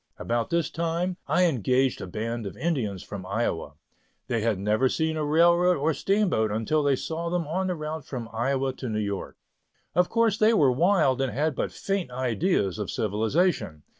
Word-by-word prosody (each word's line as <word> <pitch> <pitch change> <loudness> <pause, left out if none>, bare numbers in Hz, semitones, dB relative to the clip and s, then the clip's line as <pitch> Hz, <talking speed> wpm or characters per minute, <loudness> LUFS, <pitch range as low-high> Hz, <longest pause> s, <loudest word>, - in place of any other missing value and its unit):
About 120 -1 -1
this 170 -1 0
time, 170 +2 -1
I 180 - +3
engaged 130 - +1
a - - -5
band 115 +3 -4
of - - -9
Indians 125 - -2
from 100 -2 -7
Iowa. 95 -7 -2 0.6
They 115 -2 0
had 110 -2 +1
never 105 +7 +2
seen 160 +2 0
a 155 - -1
railroad 170 +4 +4
or 155 +3 +1
steamboat 195 - +1
until 115 +9 0
they 140 -2 +3
saw 165 +5 -4
them 175 -1 -1
on 185 +5 -1
the 180 - -1
route 155 -2 -5
from 120 -4 -5
Iowa 135 +3 0
to 130 - -5
New 110 - -2
York. 100 -2 -3 0.6
Of 180 +2 +3
course 230 -2 +2
they 220 +1 +5
were 140 -9 +4
wild 140 -3 +3
and 135 -2 0
had 150 +3 0
but - - -2
faint 195 -6 -2
ideas 125 - 0
of 105 - -3
civilization. 110 - 0
135 Hz, 185 wpm, -26 LUFS, 110-170 Hz, 0.6 s, they